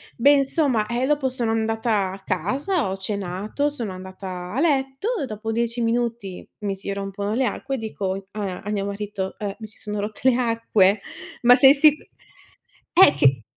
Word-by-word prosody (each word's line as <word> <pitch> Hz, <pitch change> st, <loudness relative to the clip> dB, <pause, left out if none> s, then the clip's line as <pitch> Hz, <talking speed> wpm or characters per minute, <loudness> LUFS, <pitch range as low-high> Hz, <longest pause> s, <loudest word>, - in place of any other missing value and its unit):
Beh 260 Hz, +4 st, +4 dB
insomma, 275 Hz, -5 st, +2 dB
ehm 240 Hz, +2 st, -1 dB
dopo 290 Hz, -2 st, +1 dB
sono 240 Hz, -3 st, -1 dB
andata 220 Hz, -3 st, 0 dB
a 195 Hz, +1 st, -10 dB
casa, 275 Hz, -, -1 dB
ho -, -, -2 dB
cenato, 200 Hz, +6 st, -3 dB
sono 240 Hz, -9 st, -4 dB
andata 185 Hz, -1 st, -7 dB
a 255 Hz, -, -1 dB
letto. 270 Hz, +1 st, 0 dB, 0.2 s
Dopo 220 Hz, 0 st, -5 dB
10 235 Hz, +1 st, -1 dB
minuti 230 Hz, -5 st, -2 dB
mi 200 Hz, -2 st, -2 dB
si 200 Hz, +1 st, -4 dB
rompono 200 Hz, +1 st, -4 dB
le 255 Hz, +4 st, +1 dB
acque 265 Hz, +4 st, -3 dB
e -, -, -3 dB
dico 195 Hz, -3 st, -4 dB
a 200 Hz, -3 st, -4 dB
a 200 Hz, -, -7 dB
mio 205 Hz, -2 st, -1 dB
marito, 200 Hz, -1 st, -4 dB
ehm 200 Hz, -2 st, -4 dB
mi 220 Hz, -, -7 dB
si 210 Hz, -, -18 dB
sono 210 Hz, 0 st, -5 dB
rotte 215 Hz, +5 st, 0 dB
le 250 Hz, -, +2 dB
acque. 225 Hz, -5 st, +2 dB, 0.4 s
Ma 245 Hz, +1 st, +7 dB
sei 270 Hz, +1 st, +8 dB
sic 295 Hz, +1 st, +5 dB, 1.0 s
eh 350 Hz, -4 st, +7 dB
che 135 Hz, -5 st, +3 dB
220 Hz, 175 wpm, -23 LUFS, 195-255 Hz, 1.0 s, sei